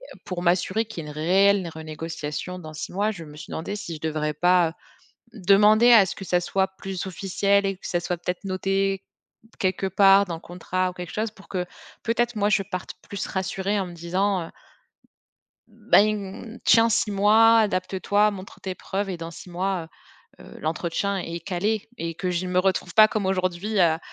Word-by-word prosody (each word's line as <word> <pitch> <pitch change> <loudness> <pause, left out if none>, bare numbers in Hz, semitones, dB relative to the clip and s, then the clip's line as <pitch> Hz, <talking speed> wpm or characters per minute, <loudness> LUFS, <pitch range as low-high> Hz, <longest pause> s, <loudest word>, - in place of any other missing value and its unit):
heu, - - -19
pour 180 -2 -4
m'assurer 185 +5 +2
qu'il 210 -7 -7
y - - -9
ait - - -6
une - - -12
réelle 190 +2 +3
renégociation 160 +2 -6
dans 155 -3 -9
6 155 - -6
mois, 205 +3 +1
je 175 -6 -8
me 150 0 -12
suis 160 - -10
demandée 170 +5 -4
si 170 -5 -6
je 155 - -11
devrais 155 -1 -1
pas 175 +1 +3 0.6
demander 210 +3 +5
à 215 -4 +8
ce 185 - -5
que 195 - -8
ça 175 0 +1
soit 190 +2 0
plus 190 -1 -5
officiel 200 +1 +1
et 195 -1 -1
que - - -8
ça 175 - 0
soit 175 0 -2
peut-être 180 +2 -4
noté 195 0 0 0.6
quelque 190 0 0
part 195 +1 +6
dans 175 -3 -4
le - - -9
contrat 185 +1 -2
ou - - -15
quelque 180 -1 -7
chose, 215 0 -2
pour 200 -2 -18
que, 180 -2 -2 0.4
peut-être, 240 +1 0
moi 205 -1 +1
je 205 - +3
parte 185 -2 -6 0.2
plus 200 - -4
rassurée 195 +1 -2
en 190 - -2
me 175 - -9
disant, 180 +3 -1
heu - - -14 1.2
«Ben, 215 0 0
tiens 230 0 +5
6 215 - +1
mois, 220 +3 +5
adapte-toi, 205 +1 +1
montre 195 -1 -10
tes 190 -1 -4
preuves 195 +2 -3
et 185 - -3
dans 165 0 -7
6 170 - -11
mois, 180 -1 -2 0.5
heu - - -13
heu, - - -13
l'entretien 170 +5 -1
est 170 -2 -5
calé» 200 +5 -2
et 165 0 -4
que 180 +2 -2
je 180 +1 -2
me 180 0 +2
retrouve 185 -1 0
pas 215 0 +7
comme 215 -5 -2
aujourd'hui 190 +2 -1
à 165 -3 +4
190 Hz, 200 wpm, -24 LUFS, 175-205 Hz, 1.2 s, à